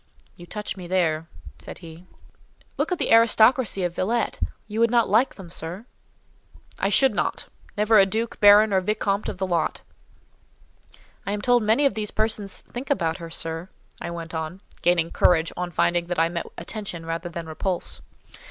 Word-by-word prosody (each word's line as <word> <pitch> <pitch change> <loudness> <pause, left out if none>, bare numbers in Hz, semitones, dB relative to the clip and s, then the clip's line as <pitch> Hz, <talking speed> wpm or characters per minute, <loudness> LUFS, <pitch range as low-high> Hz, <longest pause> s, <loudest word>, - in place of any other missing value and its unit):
"You 175 - -13
touch 210 +2 -5
me 180 -3 -9
there," 165 -3 0 0.3
said - - -9
he. 170 +2 -13 0.7
"Look - - -1
at 360 - +1
the - - -1
aristocracy 225 -2 +4
of 175 -1 -1
Villette—you 220 0 -2
would 230 0 +4
not 235 -1 +3
like 225 +7 +3
them, 180 -4 -11
sir?" 175 +5 -6 0.9
"I 195 - +1
should 265 +6 +4
not—never 215 +1 0
a 195 - +6
duc, 225 +3 -3
baron, 205 +1 +7
or 190 - +3
vicomte 205 0 -1
of - - -6
the 190 - -1
lot." 175 -3 -1 1.4
"I 200 - -3
am 205 - -3
told 245 -1 +4
many 220 +7 +2
of 275 - +3
these 210 0 -3
persons 215 -2 -1
think 250 +3 -8
about 165 - 0
her, 165 -1 -8
sir," 165 +2 -5 0.3
I - - -4
went 170 -1 -7
on, 160 +3 -5 0.2
gaining 170 -1 +2
courage 165 -2 +3
on 180 0 -3
finding 175 0 +1
that 175 - -3
I 165 +1 +3
met 170 0 -4
attention 175 -2 -5
rather 165 +1 -4
than 170 -1 -6
repulse. 170 +3 -3
190 Hz, 170 wpm, -24 LUFS, 170-215 Hz, 1.4 s, baron